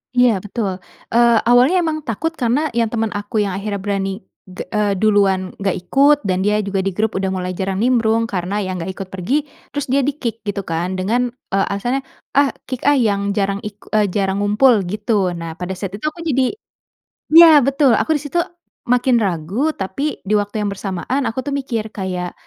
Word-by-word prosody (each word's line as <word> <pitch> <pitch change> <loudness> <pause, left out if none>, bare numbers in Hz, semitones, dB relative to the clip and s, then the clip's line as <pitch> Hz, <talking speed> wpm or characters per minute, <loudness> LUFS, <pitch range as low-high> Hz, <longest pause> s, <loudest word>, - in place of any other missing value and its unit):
Iya 245 -5 +4
betul. 200 -1 -3 0.3
Eee, 235 -1 +5
awalnya 255 +10 +4
emang 310 -1 -1
takut 320 +9 -1
karena 285 +2 0
yang 230 -1 +1
teman 225 -1 -2
aku 205 +1 -1
yang 200 - -2
akhirnya 205 0 -3
berani 195 0 -2 0.2
ge 185 - -7
eee, 210 -2 +1
duluan 195 -2 +2
gak 195 -2 0
ikut 275 +11 +3
dan 185 -2 0
dia 210 +2 +1
juga 200 -1 -2
di 190 -1 -2
grup 215 0 +1
udah 195 - -1
mulai 185 -1 -2
jarang 190 +3 -2
nimbrung 230 -2 +2
karena 200 -1 -2
ya 185 - -3
nggak 165 - -5
ikut 195 -2 -6
pergi, 235 +11 -1 0.3
terus 285 -3 -2
dia 275 - +3
di-kick 245 -6 -3
gitu 200 -1 -2
kan 175 +2 -2
dengan, 230 +7 0 0.2
eee, 195 0 +2
alasannya, 240 +7 -1 0.3
"Ah, 280 0 +2
kick 255 +2 -4
ah 290 - +6
yang 200 -5 +1
jarang 200 -1 0
iku 210 0 -10
eee, 210 -1 +3
jarang 195 +1 -1
ngumpul," 210 -1 +3
gitu. 205 -3 0
Nah 165 0 -7
pada 180 +1 -4
saat 190 0 -5
itu - - -7
aku 335 +2 -5
jadi 265 +1 +1 0.8
ya 320 -3 +9
betul 275 -1 +3
aku 315 -1 +2
di 290 - -8
situ 345 +4 +1 0.5
makin 250 -1 +3
ragu 195 - -1
tapi 235 +11 -3
di 210 - 0
waktu 205 +1 0
yang 200 - -1
bersamaan 200 +8 -3
aku 255 +4 -4
tuh 285 - -2
mikir 230 -6 -3
kayak, 180 -2 -4
210 Hz, 190 wpm, -19 LUFS, 195-250 Hz, 0.8 s, ya